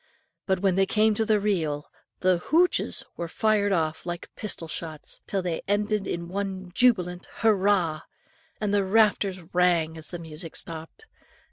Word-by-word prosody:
But 190 -2 +1
when 195 -2 +3
they 195 +1 +2
came 215 +2 +3
to 220 +1 0
the 215 -1 +3
reel, 160 -8 -1 0.4
the 185 -1 +3
hoochs! 340 - +2
were 170 - -3
fired 205 +3 +1
off 160 -3 0
like 175 -1 -6
pistol 185 -5 -2
shots, 155 -1 -5
till 195 -2 -1
they 170 -3 -2
ended 205 0 0
in 170 0 -3
one 190 -1 -4
jubilant 180 -7 +2
hurrah!! 195 -7 +3 0.6
and 210 -1 -1
the 200 -1 +3
rafters 200 -2 +2
rang 170 -3 +2
as 155 - 0
the 175 - -2
music 165 0 -8
stopped. 165 - -6
185 Hz, 155 wpm, -26 LUFS, 170-205 Hz, 0.6 s, when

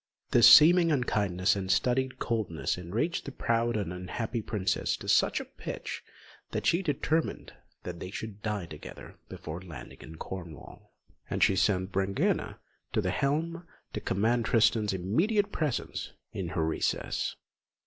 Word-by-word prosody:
This - - +8
seeming 170 +2 +8
unkindness 100 - +1
and 95 -1 -2
studied 130 +6 +1
coldness 105 -9 -1
enraged 105 - -2
the 140 - -5
proud 115 -2 0
and 95 -4 -3
unhappy 110 +6 -3
princess 100 -3 -1
to - - -10
such - - +3
a - - -6
pitch - - -6 0.5
that - - -3
she 170 - +3
determined 160 -1 -1 0.3
they 90 0 -6
should 105 +1 -7
die 105 -4 -2
together 75 -2 -11
before 80 +3 -7
landing 90 -4 -10
in 80 - -10
Cornwall; 85 -2 -9 0.4
and - - +1
she 95 - +4
sent 95 0 +1
Brangæna 95 +1 0 0.4
to - - +2
the - - -1
helm 165 +5 -1 0.3
to - - -3
command 115 +4 +1
Tristan's 110 -2 +3
immediate 175 - +1
presence 150 - -3 0.2
in 95 -3 -3
her 80 -2 -1
recess. 80 - -1
105 Hz, 140 wpm, -29 LUFS, 90-130 Hz, 0.5 s, This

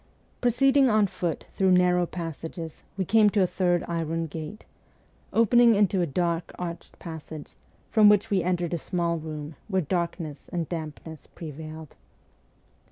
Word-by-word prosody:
Proceeding 270 +2 +4
on 215 -2 +4
foot 175 -4 -3
through 190 -1 +3
narrow 180 -1 +3
passages, 165 -1 -6 0.2
we 190 - 0
came 215 +2 +5
to 200 -2 +2
a - - +4
third 175 -1 +1
iron 165 -1 -2
gate, 160 +6 -7 0.7
opening 230 +1 +5
into 200 -2 +3
a 175 - +1
dark 170 +2 -1
arched 170 -1 -6
passage, 160 -2 -9 0.4
from 215 -2 +7
which 210 +1 +3
we 195 -2 +3
entered 175 -1 -1
a 170 - -1
small 170 -2 -1
room 155 -1 -7
where 190 -4 0
darkness 170 -2 -3
and 170 -3 -2
dampness 160 -1 -7
prevailed. 155 -1 -9
175 Hz, 145 wpm, -26 LUFS, 160-195 Hz, 0.7 s, from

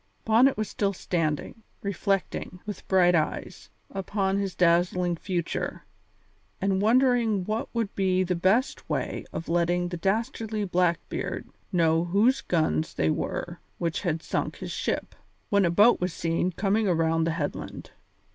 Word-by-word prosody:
Bonnet 235 +4 +5
was 215 -1 -1
still 200 -1 -1
standing, 165 +2 -2 0.2
reflecting, 195 -2 -2
with 210 -1 -7
bright 180 -2 +4
eyes, 155 -3 -2 0.2
upon 195 0 -1
this 195 -2 -3
dazzling 175 0 +2
future, 175 -1 -3 0.7
and 195 0 +1
wondering 230 -3 +3
what 215 +3 -2
would 225 -3 -1
be 185 -1 +2
the 180 0 0
best 190 +9 +1
way - - -2
of 165 - -5
letting 175 +1 +1
the 175 - -4
dastardly 215 +2 -1
Blackbeard 180 -2 -1 0.2
know 165 -2 +3
whose 210 +9 +3
guns 160 -2 0
they 80 0 +2
were - - -3 0.2
which 170 -2 -2
had 165 -4 -1
sunk - - -2
his - - -7
ship, - - -2 0.4
when 200 -3 +4
a - - +3
boat 205 +7 +5
was 180 0 0
seen 165 +2 0
coming 205 +4 +1
around 165 -2 +2
the 165 - 0
headland. 145 -4 -5
185 Hz, 145 wpm, -27 LUFS, 170-205 Hz, 0.7 s, Bonnet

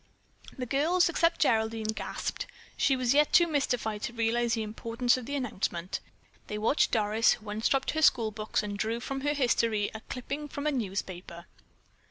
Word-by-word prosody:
The 255 - -3
girls, 320 +8 +2
except 335 0 +2
Geraldine, 220 -4 +1
gasped. - - -4 0.3
She 270 - +3
was 255 -1 +1
yet 295 +1 +4
too 345 - +6
mystified 245 -9 -1
to 240 0 -4
realize 235 +1 +1
the 225 - -2
importance 230 +3 0
of 255 -2 -6
the 285 - -3
announcement. 190 -9 -2 0.5
They 210 - -4
watched 220 +8 +2
Doris, 215 0 +3
who 215 - -10
unstrapped 230 +5 +1
her 315 - -1
school 230 -7 +4
books 215 0 -2
and 205 -1 -5
drew 225 +3 -1
from 270 +2 -4
her 290 +1 0
history 230 -6 +1
a 220 - -6
clipping 280 +4 -4
from 285 0 -6
a 300 - +2
newspaper. 185 -7 -4
235 Hz, 175 wpm, -29 LUFS, 215-275 Hz, 0.5 s, too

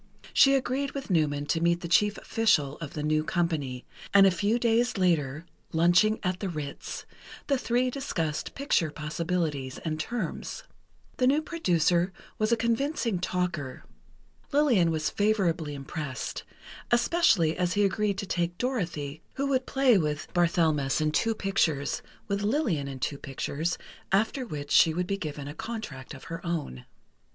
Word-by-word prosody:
She 275 0 +6
agreed 270 +1 -1
with 275 -6 -5
Newman 145 -4 +1
to 165 +2 0
meet 170 +1 +2
the 170 - -4
chief 210 +5 +3
official 155 -11 +1
of 155 -4 -7
the 150 - -4
new 155 0 +2
company, 155 -7 -1 0.3
and 195 0 +9
a 195 - +6
few 205 +6 +1
days 235 0 +2
later, 160 -5 +1 0.3
lunching 175 +6 +4
at 185 -1 -1
the 195 - -2
Ritz, 150 -4 -6 0.4
the 275 -2 +1
three 250 +1 +1
discussed 165 - -3
picture 270 - +1
possibilities 150 -3 -2
and 155 -1 -2
terms. 235 +8 -4 0.5
The 255 - +3
new 285 +3 +4
producer 180 - +1 0.3
was 215 +1 +1
a 235 - +4
convincing 235 - 0
talker. 175 -7 -2 0.7
Lillian 265 - +4
was 155 -1 -1
favorably 175 -8 +1
impressed, 140 -2 -5 0.4
especially 235 - +3
as 180 -1 0
he 205 0 +3
agreed 200 0 0
to 200 - -3
take 175 -2 -1
Dorothy, 170 - -2
who 275 - -1
would 260 -1 +1
play 265 -6 +4
with 150 -2 -3
Barthelmess 160 -6 +2
in 155 0 +1
two 225 +8 +1
pictures, 160 -9 0 0.3
with 200 0 -1
Lillian 205 - 0
in 135 -1 -6
two 140 +2 -3
pictures, 150 +4 -3 0.3
after 220 +6 +1
which 145 -5 -6
she 160 -1 +6
would 180 +1 0
be 195 +2 -2
given 150 -4 -5
a 145 - -6
contract 160 - -6
of 130 - -12
her 165 0 -7
own. 160 - -4
175 Hz, 155 wpm, -28 LUFS, 155-225 Hz, 0.7 s, and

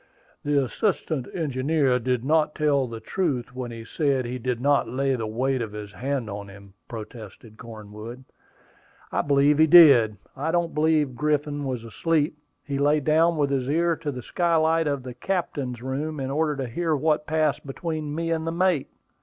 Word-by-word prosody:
"The 145 -1 +1
assistant 155 - -1
engineer 140 -3 +1
did 125 0 -1
not 150 +1 +2
tell 145 -4 +2
the 115 -1 -7
truth 135 - -2
when 125 -1 -4
he 115 -1 -8
said 135 -1 0
he 125 +1 -4
did 125 0 -2
not 140 -2 +2
lay 135 +2 0
the 115 -3 -3
weight 130 +4 -1
of 110 -3 -5
his 105 -1 -7
hand 130 +1 -3
on 100 -1 -6
him," 100 0 -14
protested 110 -1 -10
Cornwood. 110 +2 -9 0.9
"I - - +1
believe 145 +1 +3
he 160 - +6
did. 140 -11 +7 0.2
I 145 +4 -2
don't 170 0 0
believe 150 -3 +2
Griffin 145 +1 -1
was 125 -4 -3
asleep. 155 +7 0 0.3
He 140 -1 -3
lay 145 +2 +3
down 160 +3 +3
with 145 -2 +1
his 135 -1 -1
ear 170 +2 +2
to 150 -3 -4
the 125 -3 -7
skylight 165 0 +1
of 140 -3 -1
the 125 -1 -7
captain's 130 - -3
room 145 +4 -3
in 135 0 -3
order 150 +1 0
to 135 -2 -3
hear 160 +6 -1
what 150 +1 0
passed 155 -2 +1
between 150 +1 -4
me 165 +1 -2
and 160 0 -1
the - - 0
mate. 175 -3 +1
140 Hz, 180 wpm, -25 LUFS, 125-155 Hz, 0.9 s, did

